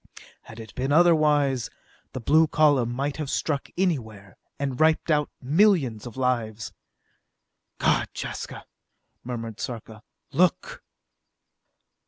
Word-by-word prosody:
Had 115 - -13
it 110 -1 -10
been 135 +2 -2
otherwise, 150 -5 +3 0.4
the - - -4
blue 155 +7 +4
column 145 -6 +3
might 140 +3 -3
have 150 -3 -4
struck 140 0 -2
anywhere, 110 - -2 0.2
and 135 -3 -3
wiped 160 +1 +3
out 150 -1 +2
millions 145 - +2
of 120 - -11
lives! 115 -4 -2 1.0
"God, - - +2
Jaska," - - -6 0.6
murmured 115 -3 -6
Sarka. 110 -3 -7 0.3
"Look!" 180 0 0
135 Hz, 110 wpm, -25 LUFS, 115-155 Hz, 1.0 s, blue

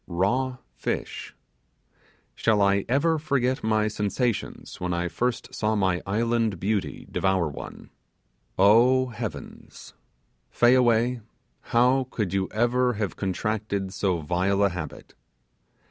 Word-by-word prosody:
Raw 125 +9 0 0.2
fish! - - -4 1.0
Shall 110 -2 +1
I 100 0 +2
ever 155 +5 +2
forget 135 -3 0
my 110 -1 +2
sensations 105 +2 -3
when 90 -1 -1
I 85 +1 -1
first 120 +8 -2
saw 110 0 0
my 95 -3 +1
island 115 -1 0
beauty 95 -8 -2
devour 95 -3 +1
one. 70 - -9 0.7
Oh, 120 +6 +5
heavens! 110 -11 -8 0.6
Fayaway, 120 - +3 0.5
how 125 +2 +3
could 105 -8 -3
you 95 -1 0
ever 120 +3 +1
have 105 -5 -3
contracted 100 0 -2
so 90 -4 0
vile 95 +5 +1
a 100 - +4
habit? 85 -5 -7
105 Hz, 115 wpm, -25 LUFS, 95-120 Hz, 1.0 s, Oh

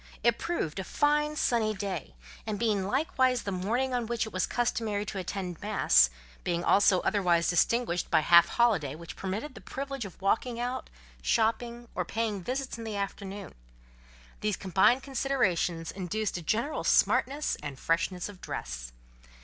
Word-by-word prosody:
It 235 0 +3
proved 265 - -2
a - - -2
fine 300 +7 +1
sunny 225 -6 +1
day; 190 - -4 0.3
and 215 -1 -2
being 205 -4 +1
likewise 260 0 +1
the 200 - -3
morning 230 +8 -1
on 240 -2 -1
which 235 0 -1
it 220 - -9
was 185 -1 0
customary 225 -4 -1
to 200 -1 -4
attend 180 -2 -5
mass; 65 - +4 0.3
being 175 -1 -1
also 195 -1 +4
otherwise 175 -5 +2
distinguished 180 0 +1
by - - +4
the - - -6
half 170 0 +8
holiday 195 - +2
which 170 +1 -9
permitted 205 +10 -4
the - - -11
privilege 275 -1 -5
of 195 -5 -9
walking 230 +5 0
out, 250 +2 -3 0.3
shopping, 235 +1 0
or - - -1
paying 220 -3 -2
visits 255 +2 -3
in - - -6
the 220 -2 -4
afternoon: 200 -1 -5 0.9
these 210 -2 -1
combined 195 +7 +3
considerations 205 - 0
induced 200 +3 -3
a 175 - -3
general 230 - -1
smartness 285 +3 +2
and 145 -3 -6
freshness 175 +2 0
of 200 -3 -12
dress. - - -5
210 Hz, 160 wpm, -29 LUFS, 180-240 Hz, 0.9 s, half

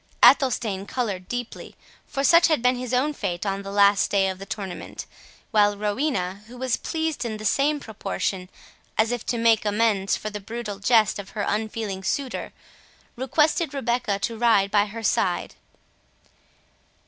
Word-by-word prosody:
Athelstane 225 -8 +4
coloured 200 -8 -3
deeply, 245 -1 -6 0.3
for 275 - -3
such 335 +5 +6
had 310 -8 +1
been 250 0 +4
his 250 -1 -5
own 265 +4 +1
fate 185 -7 -3
on 195 0 -1
the 195 - -8
last 200 0 +4
day 195 -1 +2
of 190 0 -6
the 195 - -9
tournament; 200 -4 -6 0.5
while 205 -2 +3
Rowena, 205 -3 -1
who 245 +2 -12
was 255 -1 0
pleased 320 -3 -2
in 220 -3 -4
the 215 - -8
same 290 +7 +2
proportion, 195 -5 -4 0.5
as 220 +2 +3
if 245 -2 -3
to 240 - -2
make 230 -1 +3
amends 210 -2 +1
for 215 - -5
the 210 - -5
brutal 210 -1 -6
jest 215 -1 +3
of 200 +1 -9
her 205 - 0
unfeeling 210 -2 -3
suitor, 265 +6 -2 0.6
requested 300 +5 +1
Rebecca 240 -5 0
to 225 +3 -3
ride 215 -5 +3
by 205 0 +3
her 225 +2 -8
side. 185 -3 0
220 Hz, 160 wpm, -24 LUFS, 200-250 Hz, 0.6 s, such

